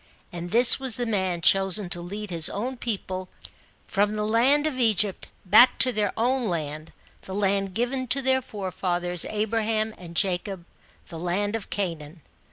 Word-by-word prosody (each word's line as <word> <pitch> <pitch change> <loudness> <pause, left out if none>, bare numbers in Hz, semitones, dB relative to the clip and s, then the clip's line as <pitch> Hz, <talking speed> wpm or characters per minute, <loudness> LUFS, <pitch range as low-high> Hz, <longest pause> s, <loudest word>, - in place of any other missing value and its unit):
And 175 0 -6
this 235 +6 +7
was 265 -3 +1
the 245 - -2
man 190 -6 -1
chosen 195 +2 +3
to 175 - +1
lead 200 +3 -7
his 165 -2 -1
own 245 +6 -4
people 190 -6 -5 0.6
from 205 +2 0
the 210 - -2
1^'id 255 +7 +2
of 285 -5 -2
Egypt, 215 -4 +1 0.2
back 215 +7 +6
to 255 - +5
their 210 -4 -1
own 245 +1 0
land 155 -3 -4 0.3
the 190 - -8
land 195 -1 -1
given 255 +2 -2
to 275 - +1
their 260 0 +2
fc/efathers 180 -4 -2
Abraham 220 0 -1
and 170 -2 -11
Jacob 185 0 -1 0.4
the 165 - -8
land 195 +5 -2
of 225 - -6
Canaan. 165 -5 -4
205 Hz, 165 wpm, -24 LUFS, 180-230 Hz, 0.6 s, this